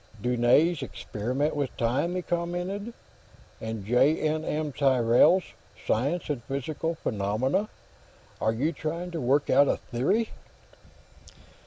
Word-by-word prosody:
"Dunne's 125 - +3
'Experiment 130 +4 -3
with 145 -3 -3
Time,'" 135 +10 0
he 180 - -2
commented. 180 +6 -3 0.7
"And 110 -3 -5
J. 125 +7 +4
N. 155 0 0
M. 155 -1 -2
Tyrrell's 130 +6 +4 0.4
'Science 140 +10 0
and 145 -5 -2
Psychical 155 +4 -2
Phenomena.' 125 - -1 0.7
Are 110 - +2
you 135 +8 0
trying 170 +3 -4
to 165 -3 -4
work 135 +4 +2
out 140 - +6
a - - +1
theory?" 190 - 0
145 Hz, 120 wpm, -27 LUFS, 120-170 Hz, 0.7 s, out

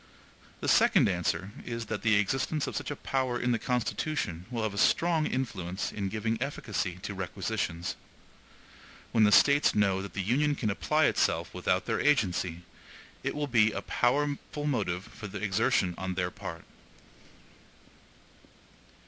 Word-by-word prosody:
The - - -3
second - - +5
answer 95 +1 -1
is, 115 -1 -4
that 110 -1 -4
the 110 -2 +3
existence 135 +8 0
of - - -5
such - - -3
a 145 - -3
power 130 -3 -1
in 125 0 +1
the 115 - +1
Constitution 125 - -2
will 115 -3 -2
have 110 -2 -1
a - - -7
strong 165 -2 +3
influence 95 -8 -3
in 100 -2 -3
giving 110 +2 -2
efficacy 110 -9 -2
to 105 - -4
requisitions. 90 -2 -3 1.2
When 110 -2 +5
the 105 - +4
States 140 +6 +5
know 100 -2 +2
that 100 -2 -8
the 95 - -2
Union 145 +8 +2
can 110 -6 -1
apply 155 +9 +2
itself - - +1
without - - 0
their - - -1
agency, 90 - +1 0.6
it - - -2
will 150 0 -1
be 115 -5 +4
a - - -4
powerful 145 +3 0
motive 100 -11 -1
for 110 -1 -9
exertion 95 -2 +1
on 95 -1 -3
their 90 -1 -1
part. - - -8
110 Hz, 150 wpm, -29 LUFS, 95-135 Hz, 1.2 s, second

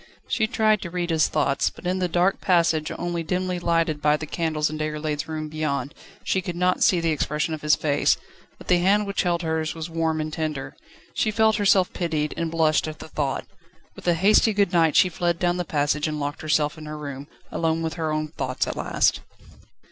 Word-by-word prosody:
She 220 - +1
tried 215 -3 +2
to 170 - -5
read 175 0 -2
his 160 -1 +3
thoughts, 140 - +1
but - - -15
in 185 +1 0
the 180 - +1
dark 175 +3 +1
passage, 165 -4 +2
only 175 -1 -2
dimly 180 +2 -2
lighted 165 -3 0
by 150 0 +3
the 155 - -6
candles 155 -1 -1
in 155 0 -5
Déroulède's 150 0 -2
room 155 -1 -4
beyond, 150 -2 -2 0.3
she 190 - 0
could 175 -2 -5
not 180 +1 +1
see 180 - +4
the 165 -1 +1
expression 150 +1 -1
of 155 - -5
his 150 0 +4
face, 145 -2 +2 0.4
but - - -14
the 180 -1 +4
hand 200 +4 +3
which 200 0 -1
held 175 -1 0
hers 160 -1 -1
was 165 +1 -6
warm 160 -1 0
and 155 0 -3
tender. 155 -4 -4 0.4
She 220 - +1
felt 220 0 +3
herself 195 -3 +3
pitied, 155 -4 -1
and 165 -1 -2
blushed 160 -2 +2
at 155 0 -6
the - - -10
thought. 140 -4 -2 0.5
With - - -11
a 175 - +4
hasty 210 +5 +4
good 200 -3 +1
night 165 -3 +3
she - - +6
fled 175 -1 -1
down 175 0 +1
the 180 - -2
passage, 150 0 0
and 150 -1 -3
locked 145 +1 -4
herself 155 0 0
in 155 - -9
her 155 0 -6
room, 140 -1 -7 0.2
alone 165 0 0
with 160 0 -2
her 160 -2 -2
own 155 0 -2
thoughts 130 -4 -2
at - - -4
last. - - +1
160 Hz, 215 wpm, -24 LUFS, 155-180 Hz, 0.5 s, she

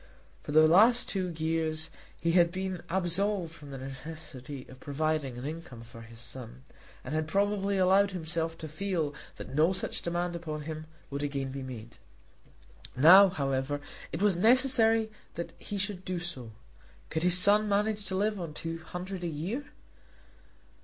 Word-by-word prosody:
For - - -7
the 155 +1 +7
last 220 +9 +6
two 185 -2 -1
years 160 -1 -1 0.3
he 170 - +1
had 170 -1 +4
been 185 -1 -3
absolved 185 0 0
from 145 -3 -12
the 135 - -6
necessity 135 0 -8
of 130 - -13
providing 145 -2 -2
an 125 - -6
income 150 -6 -7
for 115 0 -12
his 115 0 -12
son, 125 +1 -7 0.4
and 130 - -5
had 155 0 0
probably 200 +2 +1
allowed 190 +2 +4
himself 165 -2 -2
to 160 - -6
feel 160 -2 -2 0.2
that - - -9
no 160 +6 +4
such 190 - -2
demand 175 0 -2
upon 155 -3 -5
him 155 0 -6 0.2
would 140 +1 -3
again 140 -2 -2
be 135 0 -5
made. 120 -3 -8 1.0
Now, 185 +8 +9
however, 140 -3 -1 0.3
it - - -2
was 205 -3 +4
necessary 225 +1 +5 0.2
that 170 -1 -5
he 205 - -5
should 195 -1 -3
do 185 -1 -3
so. 165 -10 -7 0.6
Could 160 - -1
his 180 +1 +5
son 210 +3 +5
manage 205 0 0
to 190 - -2
live 210 +1 0
on 165 -4 -6
two 165 0 -4
hundred 180 +3 -6
a - - -1
year? 175 - -3
165 Hz, 165 wpm, -30 LUFS, 145-190 Hz, 1.0 s, Now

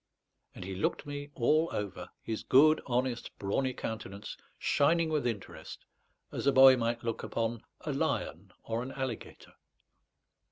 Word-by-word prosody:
And - - -7
he 95 - -5
looked 95 - -1
me 145 0 -6
all 155 +7 +3
over, 100 -3 -4
his 110 -1 -3
good, 155 +4 +5
honest, 125 -1 -1
brawny 130 +7 0
countenance 105 -2 -6 0.2
shining 160 +3 +2
with 150 -5 0
interest, 110 -5 -6 0.5
as - - -3
a - - +7
boy 130 0 +9
might 115 -1 -1
look 115 -1 -2
upon 115 0 -2 0.2
a - - -3
lion - - -2
or 115 +1 -2
an 130 +2 -6
alligator. 130 -4 -6
125 Hz, 145 wpm, -31 LUFS, 115-140 Hz, 0.5 s, boy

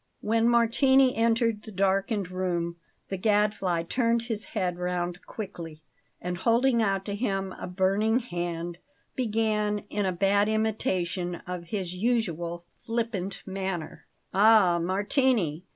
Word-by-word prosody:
When 225 +2 +2
Martini 255 +3 +4
entered 230 -1 +2
the 220 - -10
darkened 195 0 0
room, 175 -2 -2 0.3
the 195 - -2
Gadfly 205 -4 +1
turned 230 +4 +1
his 225 -3 -4
head 180 -4 -2
round 180 0 -2
quickly, 165 -7 -7 0.4
and, 180 0 -4
holding 235 +4 +3
out 195 -2 0
to 200 - -3
him 195 -3 -2
a - - -5
burning 195 +5 +2
hand, 175 -6 -4 0.4
began, 215 -3 0
in 205 -2 0
a - - +1
bad 200 +3 +2
imitation 185 -5 -1
of 180 -1 -5
his 180 -1 -4
usual 175 -6 -1 0.2
flippant 225 -5 -3
manner: 190 -4 -5 0.3
"Ah, 200 -4 +5
Martini! 195 - +1
195 Hz, 125 wpm, -27 LUFS, 180-225 Hz, 0.4 s, Ah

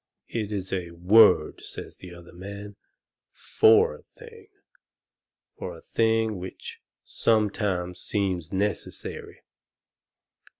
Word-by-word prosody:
"It 110 -3 -3
is 95 -2 -4
a 90 -2 -2
WORD," 90 -1 +5
says - - -9
the 90 - -11
other 85 0 -13
man, 100 +3 -9 0.5
"FOR 445 +2 +4
a 485 - -13
thing. 455 -3 -15 1.1
For - - -6
a - - -13
thing 110 -2 +1
which 90 +1 -9 0.2
sometimes 100 -5 0
seems 95 -4 -2
necessary. 100 +2 -3
100 Hz, 100 wpm, -26 LUFS, 90-115 Hz, 1.1 s, WORD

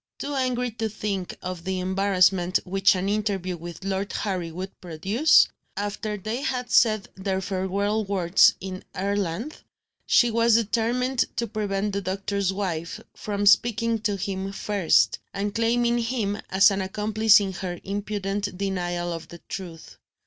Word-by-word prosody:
Too 290 - -4
angry 250 -2 0
to 225 0 -3
think 200 -3 -4
of 180 -2 -5
the 190 0 -2
embarrassment 185 -1 +2
which 195 +1 +3
an 185 +1 -2
interview 200 -3 -1
with 170 +2 -9
Lord 195 +1 -2
Harry 185 -5 -2
would 185 +4 -7
produce, 195 - +4 0.3
after 210 +1 -3
they 220 +6 -4
had 250 -5 -2
said 215 -4 +4
their 190 0 -2
farewell 200 +3 -1
words 190 -3 +4
in 185 -1 -6
Ireland, 200 - -2 0.5
she 240 -1 +4
was 230 0 +4
determined 235 +3 +1
to 235 - 0
prevent 205 -2 -2
the 200 - -1
doctor's 195 +1 -1
wife 180 -4 -3 0.2
from 205 -1 -3
speaking 230 +2 +4
to 205 -1 -1
him 195 0 -3
first, 200 -4 +2 0.2
and 200 +1 -2
claiming 235 +1 +2
him 225 -3 -1
as 195 +2 +6
an 195 0 -1
accomplice 215 +2 +4
in 195 -2 -3
her 175 -1 -5
impudent 200 -1 -3
denial 175 -3 -2
of 165 - -7
the 170 - -11
truth. 170 -4 -8
200 Hz, 150 wpm, -25 LUFS, 190-220 Hz, 0.5 s, as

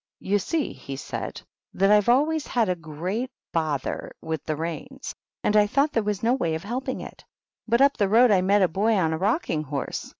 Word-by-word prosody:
" - - -69
You 205 +2 +1
see," 310 - -2
he 135 - -8
said, 135 - -6
" - - -61
that 195 +2 +3
I've 210 +1 +4
always 300 +5 +2
had 230 -5 +1
a 180 - +1
great 175 - -4 0.2
bother 155 -5 -2
with 160 -2 -4
the 155 - -1
reins, 170 - -5 0.3
and 210 - +2
I 210 -1 +5
thought 280 +7 +2
there 225 - +1
was 210 -1 -2
no 235 +2 +3
way 170 -12 0
of 160 - -5
helping 255 +5 -3
it. - - -10 0.4
But 235 +3 +3
up 280 0 +5
the 200 -3 +2
road 235 +3 +6
I 190 -3 +4
met 200 +2 +3
a - - +5
boy 205 +7 +1
on 165 -5 +1
a 160 - -2
rocking 200 - 0
horse. 145 -2 -4
205 Hz, 225 wpm, -25 LUFS, 165-245 Hz, 0.4 s, road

